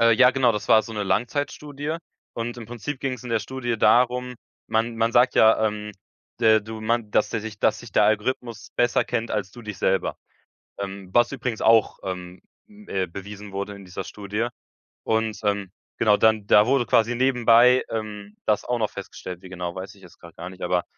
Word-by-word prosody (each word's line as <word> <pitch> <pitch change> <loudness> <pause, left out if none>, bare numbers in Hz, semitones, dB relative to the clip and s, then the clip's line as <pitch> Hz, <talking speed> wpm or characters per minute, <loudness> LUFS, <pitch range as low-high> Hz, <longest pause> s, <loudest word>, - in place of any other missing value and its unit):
Äh, 115 0 +6
ja 125 +2 +6
genau, 130 -2 +3
das 105 - -5
war 110 0 +6
so 115 - -9
'ne 105 - -2
Langzeitstudie 145 +8 -2 0.4
und 120 +1 -4
im 115 - -8
Prinzip 120 +5 -5
ging's 130 -2 -3
in - - -6
der 115 - +2
Studie 120 +2 -3
darum, 125 +2 +3 0.3
man 115 +1 0
man 115 +1 +1
sagt 125 +2 +4
ja, 110 0 +5
ähm, 105 0 -4 0.5
de 110 -2 +5
du 110 +1 -8
man, 110 -1 -1
dass 105 - +2
der 115 - -2
sich 110 -2 -7
dass 105 0 +2
sich 120 -2 -12
der 105 - +4
Algorithmus 110 +1 -1
besser 120 0 +2
kennt 115 -1 -2
als 100 -3 -2
du 120 - -12
dich 105 -3 -7
selber, 95 0 0 0.6
ähm, 95 -1 -6
was 120 +3 +3
übrigens 125 -4 -3
auch, 115 -1 +4
ähm, 90 -1 -6 0.3
äh, 205 - -4
bewiesen 100 +3 -9
wurde 100 +1 -4
in 100 - -12
dieser 95 +1 -6
Studie. 105 +4 -3 0.6
Und, 110 -2 0
ähm, 100 -2 -1 0.3
genau, 105 -2 +4
dann 110 -2 +3
da 105 0 +6
wurde 130 -2 +2
quasi 115 +1 +2
nebenbei, 125 0 +5
ähm, 105 -2 -6
das 105 -1 +1
auch 125 - 0
noch 110 -2 0
festgestellt, 90 -1 -8
wie 95 - -12
genau, 90 -1 -5
weiß 95 +3 -7
ich 100 - -20
jetzt 90 - -17
grad 85 -1 -14
gar 85 +2 -7
nicht, 95 0 -13
aber 90 0 +1
110 Hz, 200 wpm, -24 LUFS, 100-120 Hz, 0.6 s, Äh